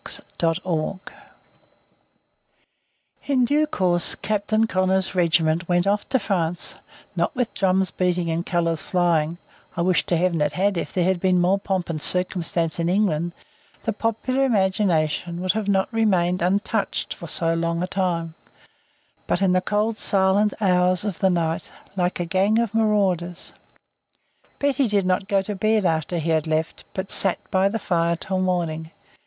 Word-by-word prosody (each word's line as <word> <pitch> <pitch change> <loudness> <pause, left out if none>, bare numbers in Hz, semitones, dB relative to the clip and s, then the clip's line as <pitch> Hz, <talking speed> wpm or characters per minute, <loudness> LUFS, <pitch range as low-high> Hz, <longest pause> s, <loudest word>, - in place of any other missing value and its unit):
CHAPTER 165 -2 +2
V 170 +1 -2 2.3
In 260 -3 +3
due 300 +4 +2
course 180 - +1
Captain 215 +1 0
Connor's 190 -2 0
regiment 165 -1 +1
went 175 0 +2
off 205 +1 0
to 265 - +3
France; 175 -6 -2 0.4
not - - -1
with 250 -2 -1
drums 190 -1 +1
beating 180 -2 0
and 165 +1 -1
colours 165 -3 -1
flying 170 -2 +1 0.4
I 170 - +1
wish 180 0 +2
to 175 - +1
Heaven 170 -2 +1
it 150 0 +1
had; 195 +5 +1
if 170 - -3
there 180 - 0
had 185 0 +1
been 185 0 +2
more 185 +3 +2
pomp 190 -3 -2
and 155 -3 -4
circumstance 170 -2 +1
in 170 0 0
England, 175 -4 0 0.5
the 225 - -1
popular 230 +5 -1
imagination 190 - +1
would 185 +1 +1 0.2
not 190 -1 +3
have - - -29
remained 185 -5 +1
untouched 200 +4 -1
for 170 - -10
so 165 +1 +1
long 170 +1 -1
a - - -2
time 175 -4 -2 0.9
but - - +1
in 195 -2 +2
the 185 0 +3
cold 215 +3 -1
silent 200 +2 +2
hours 180 -1 +2
of 200 -5 -3
the 190 - +3
night, 165 -2 -1 0.2
like 180 -1 -1
a 175 - -1
gang 195 +5 +2
of 230 -2 0
marauders. 195 -6 0 1.0
Betty 280 -2 +1
did 205 -3 +1
not 185 +1 0
go 200 -2 +1
to 210 - -4
bed 215 +1 +1
after 165 +1 0
he 165 0 -1
had 160 -1 +1
left, 160 +1 -2
but 190 0 -4
sat 195 -2 +3
by 190 +1 +3
the 220 - -2
fire 170 -5 0
till 185 +2 -3
morning. 170 -4 -1
185 Hz, 160 wpm, -23 LUFS, 170-200 Hz, 2.3 s, In